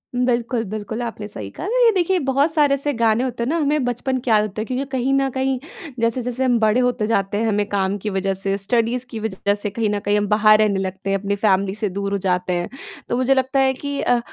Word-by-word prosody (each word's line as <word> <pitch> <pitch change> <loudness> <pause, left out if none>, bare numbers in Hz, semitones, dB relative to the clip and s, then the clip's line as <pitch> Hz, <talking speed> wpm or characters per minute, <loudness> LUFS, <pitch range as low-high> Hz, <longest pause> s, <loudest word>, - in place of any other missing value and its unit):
बिल्कुल, 245 -1 0
बिल्कुल 215 +3 -5
आपने 225 -3 -5
सही 105 - -7
कहा। - - -7
अगर - - +2
ये 460 - +6
देखिए 370 0 +2
बहुत 275 +4 +2
सारे 295 -3 +3
ऐसे 280 +1 -2
गाने 230 +1 +3
होते 245 -2 -3
हैं - - -2
ना 330 - +1
हमें 295 -1 +1
बचपन 245 +2 -1
के 245 - -5
याद 215 -1 +5
होता 210 0 -4
है - - -3
क्योंकि 255 +3 -2
कहीं 260 0 0
न 275 0 +2
कहीं 265 0 -1 0.4
जैसे-जैसे 245 +2 -1
हम 250 -2 +3
बड़े 220 +2 +3
होते 245 -3 0
जाते 200 -2 0
हैं 225 - 0
हमें 210 -1 +1
काम 195 0 0
की 215 - -1
वजह 195 0 -1
से 195 +1 -1
स्टडीज़ 235 +4 0
की 225 - -6
वजह 200 -2 -1
से 205 0 -3
कहीं 215 +1 -1
न 205 0 -1
कहीं 205 +1 +2
हम 205 0 0
बाहर 215 +1 +5
रहने 205 -3 +2
लगते 190 +1 -4
हैं 195 - +2
अपनी 200 +1 -2
फ़ैमिली 195 -1 +1
से 215 -1 -2
दूर 200 +1 -3
हो 200 - +1
जाते 180 0 0
हैं। 175 0 -2 0.4
तो 240 - 0
मुझे 255 +1 +3
लगता 265 +1 +1
है 265 0 +3
कि 285 +1 -5
अ, 245 - +2
225 Hz, 255 wpm, -21 LUFS, 205-260 Hz, 0.4 s, ये